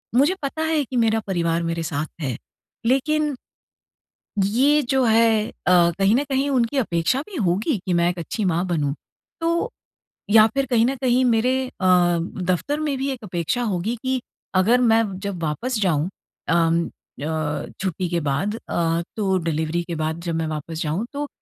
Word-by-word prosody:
मुझे 285 +8 +4
पता 280 +3 -3
है 320 -2 +1
कि 255 - -7
मेरा 225 -1 +3
परिवार 170 -3 0
मेरे 165 0 -2
साथ 155 -1 -2
है। 130 -5 -2 0.5
लेकिन 295 +4 +2 1.1
ये 260 +10 +3
जो 265 0 +1
है 225 -1 +4
अ, 175 -1 +3
कहीं 200 +3 +4
न 270 - +2
कहीं 270 +1 +1
उनकी 255 0 +1
अपेक्षा 175 0 +1
भी 400 - -9
होगी 210 - +1
कि 185 - 0
मैं 170 0 +3
1 175 0 -4
अच्छी 200 +6 -3
माँ 175 0 +1
बनूँ 150 -5 0 0.5
तो 335 +8 0 0.6
या 215 +1 +8
फ़िर 270 +5 -1
कहीं 235 -3 +3
न 265 +3 0
कहीं 255 0 +3
मेरे 245 +2 +3
अ, 180 -6 +3
दफ़्तर 185 - -2
में 295 -3 -1
भी 270 +1 -1
एक 255 -3 -6
अपेक्षा 175 +4 -2
होगी 210 +1 -1
कि 260 -1 0 0.3
अगर 225 +7 +4
मैं 225 -2 +4 0.2
जब 195 -4 -4
वापस 225 +11 -1
जाऊँ 170 -4 +1 0.4
उम 165 0 +3
अ, 150 0 -4 0.2
छुट्टी 185 -1 -2
के 170 0 0
बाद 195 +11 -1
अ, 165 -6 -1
तो 195 -3 +1
डिलिवरी 160 +1 -1
के 170 -1 -5
बाद 160 +1 -2
जब 170 -1 -3
मैं 165 0 -1
वापस 155 +1 -5
जाऊँ, 165 +8 -1
तो 290 +1 -3
195 Hz, 175 wpm, -22 LUFS, 170-255 Hz, 1.1 s, या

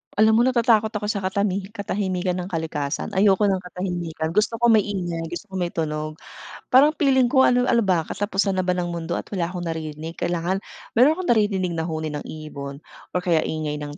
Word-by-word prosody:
Alam 220 +2 +5
mo - - +6
natatakot 230 -3 +3
ako 210 0 -2
sa 205 - -2
katami 195 0 -1
katahimikan 190 -3 -2
ng 180 - -4
kalikasan. 160 -5 -3
Ayoko 195 +1 +3
ng 195 -2 +2
katahimikan, 175 -3 -4
gusto 210 +4 +1
ko 235 +1 +3
maingay, 185 -6 0
gusto 175 +4 -7
ko - - -7
may 175 - 0
tunog. 155 -2 -3 0.5
Parang 280 +4 +6
piling 270 -4 +3
ko 265 +2 +4
ano 250 -1 +4
ano 235 -2 +3
ba 180 -5 +1
katapusan 200 +1 -1
na 185 - +1
ba 180 - +1
ng 175 -1 -2
mundo 170 0 -3
at - - -5
wala 175 -3 -1
akong 180 -1 -5
naririnig, 160 0 -5
kailangan 175 +3 -1 0.3
meron 280 +8 +5
akong 370 - -4
naririnig 195 -5 +1
na 160 - -2
huni 155 -1 -3
ng 145 - -4
ibon 140 -3 -7 0.4
or - - +1
kaya 165 -3 +3
ingay 150 -1 -3
ng 145 0 -7
185 Hz, 200 wpm, -23 LUFS, 165-210 Hz, 0.5 s, mo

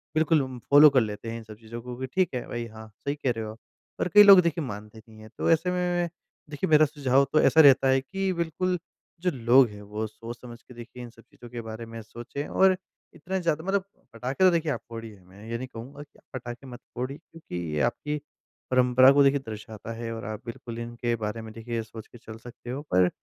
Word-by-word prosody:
बिल्कुल 155 -1 +3
उम, 130 -2 -6
फ़ॉलो 145 +1 +9
कर 130 -3 +4
लेते 110 +1 -4
हैं 115 - -4
इन 115 - -9
सब 110 -1 -11
चीज़ों 115 +1 -8
को 125 0 -7
कि, 130 - -2
ठीक 185 -2 0
है, 125 - -3
भई। 120 0 -4
हाँ, 110 0 -11 0.2
सही 140 - 0
कह 135 -4 -1
रहे 110 - -3
हो 110 - -6
आप। 110 - -13 0.4
और - - +1
कई 210 0 +10
लोग, 200 -2 +10
देखिए, 170 -1 -1
मानते 105 0 -8
नहीं 110 0 -15
हैं। 110 0 -12
तो - - 0
ऐसे 165 +3 +2
में, 180 - -1
मैं 175 -1 0 0.4
देखिए, 150 +5 -3
मेरा 155 0 +6
सुझाव 140 -1 +2
तो 155 - +5
ऐसा 160 - +6
रहता 135 -2 +6
है 130 0 +3
कि 195 +6 -2
बिल्कुल, 175 +2 -1 0.4
जो 180 -1 +1
लोग 125 +1 +5
हैं, 105 0 -11
वो 105 +2 -4
सोच-समझ 120 +2 -10
के 125 - -16
देखिए, 120 +1 -10
इन 120 - -8
सब 115 - -18
चीज़ों 120 -1 -15
के 120 -1 -6
बारे 115 +1 -7
में 115 0 -8
सोचें, 120 +6 -7
और 190 -1 +4 0.4
इतना 190 +5 -3
ज़्यादा 165 -2 -1
मतलब 195 0 0 0.3
पटाखे 130 +9 -2
तो, 185 - +7
देखिए, 165 -2 0
आप 115 - -3
फोड़िए। 115 -3 -8
मैं 100 +4 -14
ये 115 - -2
नहीं 130 +1 -6
कहूँगा 135 +6 -9
कि 145 - -24
पटाखे 125 +1 -7
मत 125 0 -9 0.2
फोड़िए, 130 +4 -4
क्योंकि 165 - -12 0.2
ये 75 - 0
आपकी 150 +2 -5 0.5
परंपरा 130 +1 +6
को 140 0 +5
देखिए, 140 +1 +4
दर्शाता 110 0 -8
है 115 0 -5
और 115 - -7
आप 110 0 -5
बिल्कुल 115 0 -7
इनके 120 0 -2
बारे 110 +1 -4
में, 110 -1 -9
देखिए, 115 +1 -6
ये 115 - -1
सोच 110 -1 -11
के 120 - -15
चल 110 -1 -11
सकते 120 +1 -12
हो। 135 +4 -3
पर 90 -1 +5
125 Hz, 240 wpm, -27 LUFS, 115-150 Hz, 0.5 s, कई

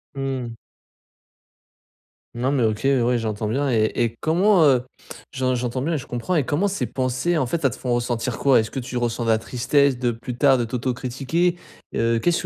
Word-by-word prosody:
Mmh. 130 -4 -3 1.8
Non 125 +3 0
mais 135 -4 +1
OK, 110 -1 0
ouais 125 -3 +2
j'entends 110 -1 -3
bien 140 +5 0
et 110 -3 +2
et 115 -1 0
comment, 180 +3 +3
heu, 130 -4 +4 0.5
j'en 130 -1 0
j'entends 125 +1 -2
bien 165 +3 -1
et - - +1
je - - -10
comprends 120 +9 -3
et 155 -6 +2
comment 155 +10 0
ces 200 - -2
pensées 130 +6 -1
en 140 - +1
fait, 165 +6 -3
elles 135 - +4
te 120 - -8
font 125 -2 -2
ressentir 120 0 -2
quoi? 135 -4 +5
Est-ce 110 0 -2
que 135 - -4
tu 125 0 -5
ressens 120 0 -1
de 115 - 0
la 110 - +4
tristesse 130 +3 +1
de 120 -1 +1
plus 120 +1 -5
tard 135 0 +4
de 120 - 0
t'autocritiquer? 130 +8 -1 0.4
Heu, 115 0 +1
qu'est-ce 170 +8 +1
125 Hz, 200 wpm, -22 LUFS, 120-140 Hz, 1.8 s, quoi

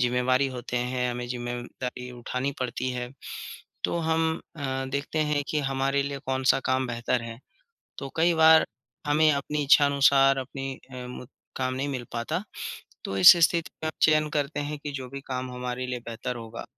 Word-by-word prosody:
ज़िम्मेवारी 125 +2 +2
होते 125 -1 -5
हैं, 125 0 0
हमें 120 0 -4
ज़िम्मेदारी 125 +1 -5
उठानी 125 +2 -3
पड़ती 130 0 -2
है 125 0 -4 0.8
तो - - +1
हम 160 0 +1 0.2
अ, - - -9 0.3
देखते 140 +3 -2
हैं 145 -1 +1
कि 155 - 0
हमारे 135 +1 +1
लिए 140 0 -4
कौन-सा 130 0 +2
काम 130 0 +1
बेहतर 120 0 -1
है। 115 0 -7 0.6
तो 135 - -5
कई 170 +1 +4
बार 160 0 +7 0.4
हमें 155 +1 +4
अपनी 145 +1 -1
इच्छा 145 +1 +6
अनुसार 135 -1 +5
अपनी 135 +1 -4 0.2
अ, 125 -1 -6
मु 125 0 -8 0.3
काम 130 0 -1
नहीं 135 +2 -2
मिल 130 -3 -3
पाता, 155 - -2 0.6
तो 95 - -3
इस 95 - +10
स्थिति 170 -2 -3
में - - 0
आप 155 - -1
चयन 155 -1 +4
करते 145 0 -1
हैं 145 +1 -4
कि 145 0 -6
जो 130 -2 -5
भी 140 0 -6
काम 130 -1 -3
हमारे 125 0 -4
लिए 125 -1 -3
बेहतर 120 +2 -5
होगा, 115 0 -7
130 Hz, 180 wpm, -27 LUFS, 125-145 Hz, 0.8 s, इस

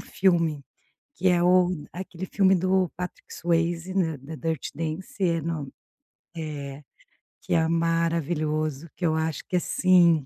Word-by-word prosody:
filme, 170 -6 +1 0.5
que 190 - +2
é 175 -1 +3
o 180 0 +5 0.2
aquele 180 0 -6
filme 190 0 +3
do 185 -1 +2
Patrick 180 0 -7
Swayze, 170 +1 0
né, 165 -6 +1
The 145 +5 -8
Dirty 160 -3 -3
Dancing, 160 +3 -3 0.3
é - - -3
no 150 -4 -3 0.7
é, 145 -3 -5 0.6
que - - -3
é 160 -1 +3
maravilhoso, 165 -2 0
que 180 - -2
eu 160 -1 +2
acho 160 -2 -1
que, - - -2
assim, 175 -4 +4
165 Hz, 140 wpm, -26 LUFS, 155-180 Hz, 0.7 s, o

